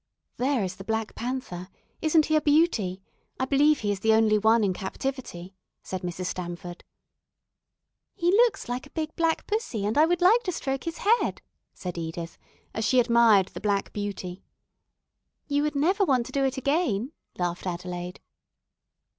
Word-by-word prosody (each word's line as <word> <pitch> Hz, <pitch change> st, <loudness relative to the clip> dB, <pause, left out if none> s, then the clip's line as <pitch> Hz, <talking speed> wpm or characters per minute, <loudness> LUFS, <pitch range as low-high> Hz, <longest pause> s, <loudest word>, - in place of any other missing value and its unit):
"There 260 Hz, -3 st, +1 dB
is 185 Hz, 0 st, -4 dB
the 195 Hz, -, -8 dB
Black 220 Hz, +1 st, -2 dB
Panther. 235 Hz, -8 st, -5 dB, 0.3 s
Isn't 315 Hz, 0 st, +4 dB
he 310 Hz, -, +1 dB
a 305 Hz, -, +4 dB
beauty? 270 Hz, -, +2 dB, 0.4 s
I 260 Hz, -, +1 dB
believe 290 Hz, +2 st, +3 dB
he 205 Hz, -2 st, 0 dB
is 200 Hz, -, -2 dB
the 220 Hz, +3 st, +3 dB
only 215 Hz, -1 st, +4 dB
one 220 Hz, +1 st, +4 dB
in 195 Hz, -2 st, +2 dB
captivity," 190 Hz, -2 st, -5 dB, 0.3 s
said 185 Hz, -1 st, -5 dB
Mrs. 180 Hz, +1 st, -4 dB
Stamford. 175 Hz, -1 st, -6 dB, 1.3 s
"He 345 Hz, +1 st, +2 dB
looks 445 Hz, 0 st, +3 dB
like 245 Hz, +3 st, -4 dB
a 285 Hz, -, -28 dB
big 315 Hz, -1 st, -3 dB
black 330 Hz, -1 st, 0 dB
pussy, 415 Hz, -, -2 dB
and 215 Hz, +7 st, +1 dB
I 315 Hz, -, +6 dB
would 350 Hz, 0 st, +1 dB
like 440 Hz, +7 st, +6 dB
to 365 Hz, -, 0 dB
stroke 270 Hz, -5 st, -3 dB
his 330 Hz, 0 st, -4 dB
head," 460 Hz, +4 st, +1 dB, 0.3 s
said 180 Hz, -2 st, -5 dB
Edith, 165 Hz, +1 st, -6 dB, 0.3 s
as 220 Hz, -, -2 dB
she 250 Hz, +3 st, +3 dB
admired 235 Hz, -5 st, +5 dB
the -, -, -9 dB
black 200 Hz, -2 st, 0 dB
beauty. 200 Hz, -3 st, -5 dB, 1.0 s
"You 285 Hz, 0 st, 0 dB
would 300 Hz, 0 st, -1 dB
never 370 Hz, +8 st, +2 dB
want 260 Hz, -9 st, +2 dB
to -, -, -9 dB
do 275 Hz, -, 0 dB
it 265 Hz, 0 st, -1 dB
again," 265 Hz, -, 0 dB, 0.3 s
laughed 175 Hz, +1 st, -2 dB
Adelaide. 180 Hz, 0 st, -5 dB
235 Hz, 170 wpm, -26 LUFS, 190-300 Hz, 1.3 s, I